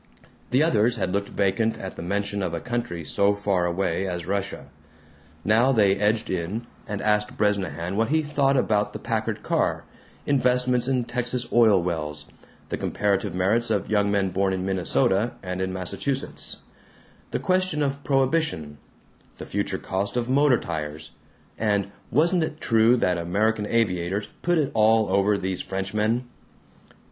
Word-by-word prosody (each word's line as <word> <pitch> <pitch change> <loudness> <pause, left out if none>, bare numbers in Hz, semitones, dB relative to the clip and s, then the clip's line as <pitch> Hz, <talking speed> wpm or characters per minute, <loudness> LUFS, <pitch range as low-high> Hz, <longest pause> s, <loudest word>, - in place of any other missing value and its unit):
The 130 +4 +3
others 120 -6 +3
had 90 - -2
looked 100 0 -1
vacant 100 +3 0
at 95 - -7
the - - -7
mention 100 +3 -2
of 90 -3 -2
a - - -3
country 120 -9 -4
so 100 +7 +2
far 100 -3 0
away 95 +1 -1
as 90 -2 -4
Russia. 100 +1 -3 0.8
Now 115 +5 +4
they 100 -6 +4
edged 105 +2 +1
in 95 +6 -3 0.2
and 105 -1 -4
asked 105 0 +1
Bresnahan 95 -3 0
what 115 +2 +2
he 155 +1 +2
thought 140 -2 +1
about 105 -4 +1
the - - -4
Packard - - -2
car, - - 0 0.4
investments 125 -2 +2
in 130 -2 +1
Texas 125 0 -2
oil 110 -5 +6
wells, 75 -4 -3 0.4
the - - -2
comparative 100 -2 -1
merits 110 +6 +1
of 105 -2 -1
young 105 -1 +3
men 100 -2 +1
born 95 +1 0
in 95 0 -2
Minnesota 95 +3 +1
and 90 0 -4
in 95 0 -1
Massachusetts, 95 +9 -3 0.7
the - - -1
question 185 -5 +1
of 140 0 -2
prohibition, 135 - 0 0.6
the - - -7
future - - -2
cost 100 +5 -3
of 120 -1 -1
motor 135 0 +4
tires, 80 -1 -5 0.5
and 100 -2 0 0.2
wasn't 170 +3 +3
it 155 -1 -4
true 115 +1 +4
that 90 -6 +1
American 105 +5 0
aviators 100 -2 0
put 175 0 +2
it 150 -4 +1
all 110 -1 +4
over 100 +2 +3
these 95 -1 -2
Frenchmen? 105 +5 -1
105 Hz, 155 wpm, -25 LUFS, 95-120 Hz, 0.8 s, oil